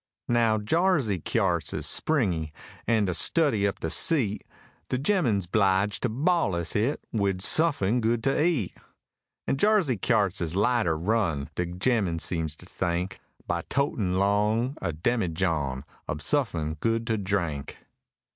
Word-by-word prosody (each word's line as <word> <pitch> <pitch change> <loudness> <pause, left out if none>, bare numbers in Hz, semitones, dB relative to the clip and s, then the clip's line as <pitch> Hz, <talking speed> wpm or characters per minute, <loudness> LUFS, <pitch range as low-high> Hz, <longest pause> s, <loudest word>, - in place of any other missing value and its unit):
Now, 115 -2 +3
Jarsey 135 - +1
kyarts - - 0
is - - -3
springy, 90 - +1 0.4
an,' 110 -3 +3
to 90 - 0
studdy 110 - +2
up - - -9
de 80 - -2
seat, 130 - +2 0.5
De 125 - 0
gemmen's 130 - +1
'bliged 100 +1 +1
to 125 - 0
ballus' 115 - 0
hit 115 +8 0
wid 100 -4 0
suffin 125 -7 +2
good 115 +1 0
to 135 +2 +2
eat; 155 - 0 0.7
An' - - 0
Jarsey 190 - +2
kyarts 100 -3 +1
is 85 0 -3
lighter 105 -5 +2
run, 85 -6 -1
de 90 +3 -2
gemmen 90 -1 0
seems 80 -2 -1
to 90 - -14
think, 90 +1 -3 0.3
By 85 -1 -1
totin' 110 -10 0
long 105 +6 +1
a - - -1
demijohn 80 - -1 0.3
ob 70 - -2
suffin 85 - -1
good 115 +3 0
to 110 -2 -1
drink. 85 -8 -2
105 Hz, 140 wpm, -26 LUFS, 90-125 Hz, 0.7 s, Now